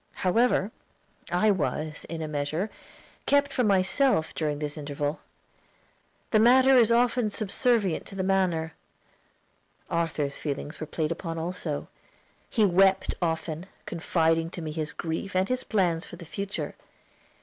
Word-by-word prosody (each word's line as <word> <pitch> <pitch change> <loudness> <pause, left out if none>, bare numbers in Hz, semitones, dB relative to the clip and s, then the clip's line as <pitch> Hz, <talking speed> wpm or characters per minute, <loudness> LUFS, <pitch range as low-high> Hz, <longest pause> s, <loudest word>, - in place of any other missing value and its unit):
However, 225 +1 +3 0.6
I 210 +5 +4
was, 155 -4 -2
in 165 -1 -4
a - - -3
measure, 155 +7 -2 0.6
kept 285 0 +3
from 250 -4 +2
myself 195 - +2
during 150 -2 -1
this 150 -1 -4
interval. 145 0 -3 1.1
The 215 - +5
matter 260 +4 +6
is 235 -2 +6
often 240 -1 +3
subservient 215 -2 0
to - - -9
the 190 - -1
manner. 180 -4 +1 1.2
Arthur's 155 -4 -1
feelings 145 +1 -4
were 155 - -5
played 155 0 -2
upon 165 -1 -4
also. 165 -3 -3 0.6
He 220 -4 +3
wept 190 +1 +3
often, 165 0 -2 0.2
confiding 165 -1 +1
to 175 - -7
me 155 - -4
his 155 0 -3
grief 165 +4 -4
and 185 +1 +2
his 255 0 -1
plans 180 -6 0
for - - -9
the 170 0 -11
future. 195 +6 -4
175 Hz, 140 wpm, -27 LUFS, 160-205 Hz, 1.2 s, matter